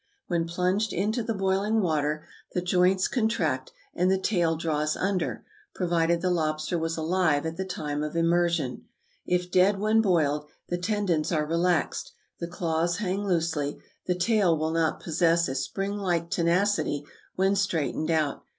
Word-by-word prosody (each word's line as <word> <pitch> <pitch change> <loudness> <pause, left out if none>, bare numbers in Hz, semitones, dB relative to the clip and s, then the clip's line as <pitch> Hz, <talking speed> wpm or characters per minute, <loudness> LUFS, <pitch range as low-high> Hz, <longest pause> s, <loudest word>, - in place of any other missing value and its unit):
When 170 -2 -1
plunged 185 +5 0
into 215 +7 0
the 225 0 -2
boiling 195 +3 +1
water, 155 -4 0 0.3
the 180 - 0
joints 180 +1 +3
contract, 165 - 0 0.2
and 180 +1 +2
the 190 - +3
tail 175 -4 +1
draws 155 -2 -1
under, 190 -1 -1 0.3
provided 170 -1 +1
the 185 - +1
lobster 155 0 -1
was 165 0 -2
alive 160 -2 +1
at 160 0 -3
the 190 +2 -3
time 150 -5 -3
of 150 +2 -4
immersion. 170 -5 +1 0.4
If 180 0 0
dead 190 +3 +4
when 215 +2 +3
boiled, 150 -7 +1 0.2
the 175 - -1
tendons 180 -5 0
are 155 -3 +1
relaxed, 170 +2 0 0.3
the 170 - -3
claws 170 0 -1
hang 195 -1 -2
loosely, 160 -5 0 0.3
the 180 - +1
tail 185 -3 +3
will 155 +1 -1
not 165 -1 0
possess 170 0 +2
a 130 - -3
spring 195 +9 -3
like 175 -4 -1
tenacity 170 -4 +1 0.3
when 195 +1 +2
straightened 160 -5 -1
out. 155 -3 0
170 Hz, 155 wpm, -27 LUFS, 160-190 Hz, 0.4 s, dead